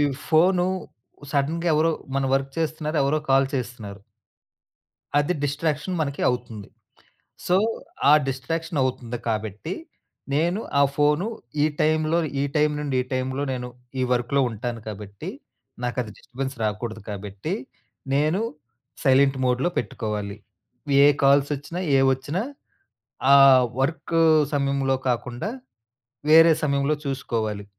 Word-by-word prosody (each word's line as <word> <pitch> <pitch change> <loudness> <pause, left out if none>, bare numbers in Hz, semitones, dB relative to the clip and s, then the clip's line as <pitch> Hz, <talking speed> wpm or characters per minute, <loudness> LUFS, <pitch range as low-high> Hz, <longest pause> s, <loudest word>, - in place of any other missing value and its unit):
ఈ - - +4 0.3
ఫోను 180 +3 +4 0.7
సడెన్‌గా 160 +5 0
ఎవరో 160 +2 +3 0.2
మన 135 - +1
వర్క్ 135 0 -1
చేస్తున్నారు. 155 -1 -2
ఎవరో 150 +3 +2
కాల్ 135 0 +5
చేస్తున్నారు. 110 -6 -5 1.2
అది 145 +5 +1
డిస్ట్రాక్షన్ 150 +4 -1
మనకి 140 -2 -3
అవుతుంది. 120 -4 -5 0.8
సో, 180 - +4 0.5
ఆ - - +8 0.2
డిస్ట్రాక్షన్ 160 +5 -3
అవుతుంది 125 -2 -2
కాబట్టి 110 - -3 0.6
నేను 175 +7 +1 0.2
ఆ - - +5
ఫోను 150 +6 +2 0.4
ఈ - - +5 0.2
టైంలో 155 +1 +2 0.2
ఈ - - +1
టైం 150 0 +3
నుండి 140 -3 -2
ఈ - - -11
టైంలో 130 +1 -1
నేను 125 -1 -4 0.3
ఈ - - +1
వర్క్‌లో 125 +3 +1
ఉంటాను 115 +2 -5
కాబట్టి, 100 -1 -8 0.6
నాకది 120 -2 -2
డిస్టర్బెన్స్ 135 +1 -6
రాకూడదు 110 +1 -3
కాబట్టి, 100 -1 -5 0.6
నేను 155 +7 +2 0.6
సైలెంట్ 135 0 +4
మోడ్‌లో 125 +7 +1
పెట్టుకోవాలి. 105 -2 -3 0.7
ఏ - - +8 0.2
కాల్స్ 140 +1 +4
ఒచ్చినా, 165 +6 -6 0.2
ఏవొచ్చినా 135 +7 +1 0.9
ఆ - - +10 0.5
వర్క్ 160 +4 -1 0.4
సమయంలో 140 -1 +1
కాకుండా 125 - -2 0.8
వేరే 165 +1 +8
సమయంలో 140 0 +1
చూసుకోవాలి. 110 -6 -2
135 Hz, 115 wpm, -24 LUFS, 120-155 Hz, 1.2 s, ఆ